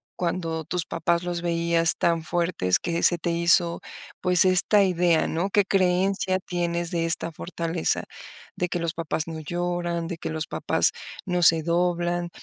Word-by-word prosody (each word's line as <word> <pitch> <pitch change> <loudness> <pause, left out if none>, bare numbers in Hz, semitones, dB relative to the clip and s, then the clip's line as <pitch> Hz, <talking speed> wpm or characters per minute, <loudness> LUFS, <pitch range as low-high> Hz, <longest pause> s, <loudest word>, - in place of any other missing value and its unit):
cuando 165 -2 -2
tus 170 +2 -2
papás 170 +1 -1
los 175 -1 -3
veías 170 -1 +2
tan 165 -1 +1
fuertes 170 - 0
que 170 0 -2
se 175 - +4
te 170 +1 -2
hizo, 170 0 +2 0.4
pues, 180 0 +3
esta 185 +3 +4
idea, 175 -3 +2
¿no? 175 +5 -2
¿Qué 205 0 +2
creencia 185 0 +1
tienes 175 -2 -2
de 165 -1 0
esta 165 0 -1
fortaleza? 165 0 -2 0.5
De 180 - -2
que 175 - -2
los 170 -1 -2
papás 165 -1 -3
no 160 -1 -6
lloran, 175 +1 -3
de 170 0 -5
que - - -5
los 160 0 -3
papás - - +1 0.3
no 180 -2 -1
se 165 -1 +5
doblan. 175 +1 0
170 Hz, 165 wpm, -25 LUFS, 165-180 Hz, 0.5 s, se